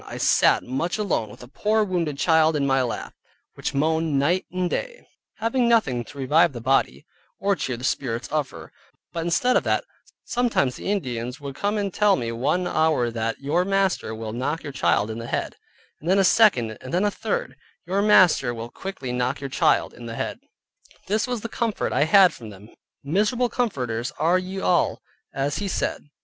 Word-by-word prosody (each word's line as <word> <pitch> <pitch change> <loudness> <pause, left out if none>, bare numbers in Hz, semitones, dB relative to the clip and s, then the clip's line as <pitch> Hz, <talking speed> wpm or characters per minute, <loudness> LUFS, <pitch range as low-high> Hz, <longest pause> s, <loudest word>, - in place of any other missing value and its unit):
I - - -7
sat - - +3
much 135 - -2
alone 185 - -1
with 105 - -12
a - - -11
poor 215 - +1
wounded 170 -7 -2
child 160 0 +3
in 140 -2 +1
my 135 -1 +2
lap, 125 -2 -4 0.4
which - - -4
moaned 160 0 +1
night 170 +7 +1
and 185 0 -1
day, - - -4 0.3
having 235 +2 +1
nothing 135 - +2
to 140 - -13
revive 150 +4 +3
the 120 - -6
body, 115 - 0 0.3
or 200 0 +1
cheer 130 -7 -3
the 125 - -10
spirits 125 -3 -2
of 150 -2 -1
her, 80 -1 -11 0.4
but 165 - -2
instead 245 +9 +2
of - - +3
that, - - +1 0.4
sometimes 235 - 0
one - - -6
Indian 125 - -2
would 140 -2 -7
come 205 +8 -1
and 200 -3 -2
tell 210 -2 +4
me 115 -8 -3
one 140 +10 0
hour 155 -8 +1
that 115 +2 -3
"your 145 +6 +1
master 195 - 0
will 110 -1 -6
knock 145 +7 -2
your 145 - -6
child 105 -1 +1
in 110 - -6
the 115 - -6
head," - - -3 0.4
and 165 - -5
then 190 - +4
a 195 - +4
second, 155 - +3
and 130 - -8
then 185 +4 +1
a 205 - +2
third, 485 - -3 0.3
"your 190 +3 0
master 180 - +4
will 115 +1 -7
quickly 190 -10 -6
knock 125 +2 -1
your 135 -1 -6
child - - +2
in 120 -1 -10
the 115 - -6
head." - - -4 0.7
This 210 +4 0
was 245 -3 -3
the 230 - -4
comfort 230 -2 -2
I 145 - +3
had 190 +2 +6
from 115 -3 -10
them, 100 +1 -13 0.3
miserable 210 - +1
comforters 125 - -2
are 170 +4 +3
ye 185 +1 -5
all, 180 -2 +1 0.3
as 140 +1 -2
he 205 - -2
said. 170 - -3
155 Hz, 200 wpm, -24 LUFS, 125-195 Hz, 0.7 s, had